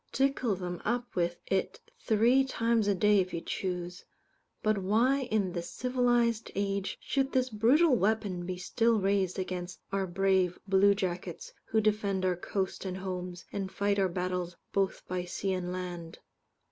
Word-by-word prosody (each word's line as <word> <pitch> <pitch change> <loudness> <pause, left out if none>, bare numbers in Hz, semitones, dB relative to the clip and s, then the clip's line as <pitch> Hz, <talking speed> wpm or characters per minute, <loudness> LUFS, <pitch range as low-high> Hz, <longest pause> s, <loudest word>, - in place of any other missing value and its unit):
Tickle 265 -5 +1
them 180 -1 -5
up 240 +2 -2
with 175 -1 0
it 190 -1 -1 0.2
three 235 +5 +4
times 230 -4 +1
a 200 - +3
day 210 +1 +4
if 185 -1 -1
you - - -1
choose. 180 0 -4 0.6
But 215 -1 +2
why, 240 +7 +2
in 205 -4 +1
this 175 -1 -4
civilized 240 -2 +1
age, 200 0 -1
should 270 0 0
this 255 -1 +1
brutal 255 +8 +4
weapon 200 -5 0
be 185 -1 -3
still 225 +4 +2
raised 195 -2 +1
against 180 -1 -4
our 195 -1 0
brave 190 0 +2
blue 195 +1 +5
jackets, 190 - -4
who 220 - +1
defend 205 -3 +1
our 180 -1 +2
coast 190 +2 -3
and 185 -1 -4
homes, 180 -2 -5
and 195 -2 -3
fight 200 0 0
our 190 -1 +2
battles 180 0 -2 0.2
both 195 -1 0
by 180 0 -2
sea 190 +2 -2
and 180 -1 -3
land. 175 -2 -6
195 Hz, 160 wpm, -30 LUFS, 180-225 Hz, 0.6 s, blue